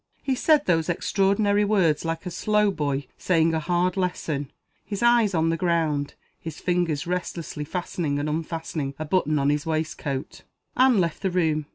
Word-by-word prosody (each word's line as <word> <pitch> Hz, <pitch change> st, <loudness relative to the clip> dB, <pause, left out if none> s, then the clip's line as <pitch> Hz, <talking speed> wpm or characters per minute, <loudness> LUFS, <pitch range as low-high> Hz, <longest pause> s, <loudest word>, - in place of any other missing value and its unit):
He 270 Hz, -, 0 dB
said 295 Hz, +3 st, +3 dB
those 165 Hz, -1 st, +1 dB
extraordinary 200 Hz, +3 st, +2 dB
words 190 Hz, -8 st, +2 dB
like 165 Hz, +1 st, -3 dB
a 180 Hz, -, -4 dB
slow 210 Hz, +3 st, +2 dB
boy 145 Hz, -5 st, -2 dB
saying 165 Hz, -2 st, +2 dB
a 160 Hz, -, +1 dB
hard 175 Hz, +2 st, 0 dB
lesson 165 Hz, -7 st, -2 dB, 0.3 s
his 205 Hz, +1 st, -4 dB
eyes 235 Hz, -5 st, +4 dB
on 165 Hz, 0 st, +2 dB
the 165 Hz, -, 0 dB
ground, 160 Hz, -4 st, 0 dB, 0.2 s
his 160 Hz, -2 st, -7 dB
fingers 175 Hz, -5 st, 0 dB
restlessly 170 Hz, -3 st, -4 dB
fastening 165 Hz, -3 st, -2 dB
and 145 Hz, +1 st, -2 dB
unfastening 155 Hz, -2 st, -3 dB
a 155 Hz, -, -4 dB
button 155 Hz, -2 st, +1 dB
on 140 Hz, 0 st, +2 dB
his 150 Hz, +2 st, -2 dB
waistcoat. 155 Hz, -3 st, -3 dB, 0.3 s
Anne 255 Hz, -4 st, +5 dB
left 170 Hz, -3 st, -1 dB
the 195 Hz, -, 0 dB
room. 160 Hz, -4 st, 0 dB
165 Hz, 170 wpm, -25 LUFS, 155-190 Hz, 0.3 s, Anne